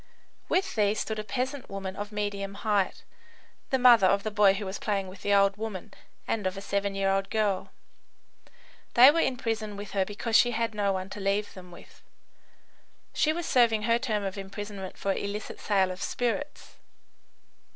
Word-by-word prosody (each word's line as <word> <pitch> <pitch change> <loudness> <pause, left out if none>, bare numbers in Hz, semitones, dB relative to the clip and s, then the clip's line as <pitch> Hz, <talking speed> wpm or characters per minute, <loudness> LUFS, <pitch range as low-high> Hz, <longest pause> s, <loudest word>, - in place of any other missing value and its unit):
With 380 +1 +1
these 210 -1 +1
stood 220 -1 -3
a - - -3
peasant 260 +4 -3
woman 195 -1 -5
of 205 +2 -6
medium 200 -1 -3
height, 200 -2 0 0.7
the 265 - +2
mother 240 -6 +7
of 200 +1 +2
the 215 - -3
boy 205 -2 +5
who 205 +1 -4
was 190 +1 -5
playing 200 -3 -1
with 185 +1 -12
the 205 - -1
old 200 0 +4
woman 210 -2 -6 0.3
and 210 -4 -1
of 185 +1 -4
a - - -3
seven 200 0 -2
year 195 0 +1
old 195 0 0
girl. 210 -3 0 1.3
These 255 +4 +9
were 330 - +1
in 265 -5 +1
prison 220 -3 -3
with 205 0 -7
her 195 -2 +1
because 210 +3 -3
she 240 +1 +5
had 230 0 -1
no 205 -1 +1
one 190 0 -4
to - - -7
leave 200 +1 -1
them 180 -1 -12
with. 175 - -15 1.1
She 310 - +2
was 340 +1 -3
serving 230 -6 +3
her 230 +1 +2
term 215 -5 -1
of 195 0 -4
imprisonment 195 -1 -7
for 195 - 0
illicit 200 +2 -5
sale 195 -3 +1
of 185 - -8
spirits. 250 +5 -3
205 Hz, 185 wpm, -28 LUFS, 195-225 Hz, 1.3 s, These